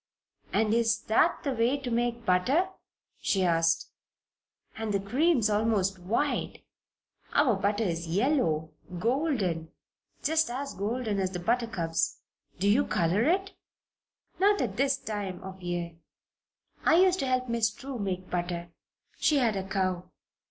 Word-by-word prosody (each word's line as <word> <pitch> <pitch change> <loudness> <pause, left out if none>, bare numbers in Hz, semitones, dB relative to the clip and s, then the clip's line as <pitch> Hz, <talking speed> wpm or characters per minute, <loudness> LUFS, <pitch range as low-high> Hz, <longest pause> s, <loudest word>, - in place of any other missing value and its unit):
"And 220 0 +2
is 230 -1 +3
that 240 +10 +2
the 280 - 0
way 240 +4 +2
to 265 -3 -5
make 235 0 -1
butter?" 260 - +2 0.5
she 190 -2 +1
asked. 165 -1 +2 0.8
"And 220 -2 -2
the - - +2
cream's 250 - +2
almost 205 -3 +1
white. 225 +11 -1 0.7
Our 265 -7 +4
butter 205 +3 0
is 170 -3 -2
yellow 170 - +1 0.3
golden. 220 - 0 0.5
Just 320 0 +2
as 275 +3 -4
golden 215 +1 -2
as 190 -1 0
the 180 -1 -5
buttercups. 185 -6 0 0.4
Do 195 - 0
you 230 +8 +4
color 180 +4 +1
it?" 385 +4 +1 0.9
"Not 405 +1 +4
at 210 -6 -1
this 275 +3 +2
time 205 -7 -4
of 190 0 -9
year. 175 -1 -4 0.9
I - - +5
used 370 +1 +4
to 270 - -1
help 255 0 0
Miss 230 -2 +1
True 260 +3 -7
make 185 -2 -3
butter. 175 -1 -3 0.5
She 300 - +3
had 235 -6 +2
a 195 0 -4
cow. 185 -2 -1
215 Hz, 140 wpm, -28 LUFS, 185-260 Hz, 0.9 s, I